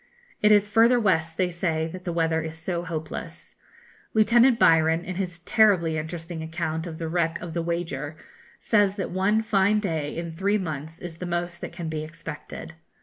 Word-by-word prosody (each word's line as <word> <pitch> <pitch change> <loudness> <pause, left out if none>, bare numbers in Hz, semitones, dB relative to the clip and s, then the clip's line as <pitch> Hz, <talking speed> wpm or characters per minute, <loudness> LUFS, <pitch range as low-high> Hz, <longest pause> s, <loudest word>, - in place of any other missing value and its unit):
It 210 - +5
is 205 -1 +5
further 230 +3 +5
west, 165 -6 +1
they 180 -1 +1
say, 165 -2 -1
that 185 +2 -9
the 175 - -1
weather 165 -1 +1
is 160 0 -6
so 170 +1 -3
hopeless. 160 -3 -6 0.6
Lieutenant 235 +3 +5
Byron, 160 -3 +4
in 185 - -4
his 180 -3 -3
terribly 180 -3 +3
interesting 165 +1 -6
account 160 0 -3
of 160 -2 -7
the 165 - -4
wreck 165 0 0
of 175 -2 -7
the 170 - -1
'Wager,' 165 -4 -3 0.4
says 205 -3 +2
that 195 - -3
one 200 +4 +2
fine 210 -1 +3
day 160 -8 -2
in 170 0 -4
three 195 +5 +1
months 160 -3 -5
is 170 -2 -7
the 180 - -5
most 175 0 -3
that - - -5
can 170 -1 -6
be 155 -1 -3
expected. 160 0 -8
170 Hz, 185 wpm, -25 LUFS, 160-195 Hz, 0.6 s, It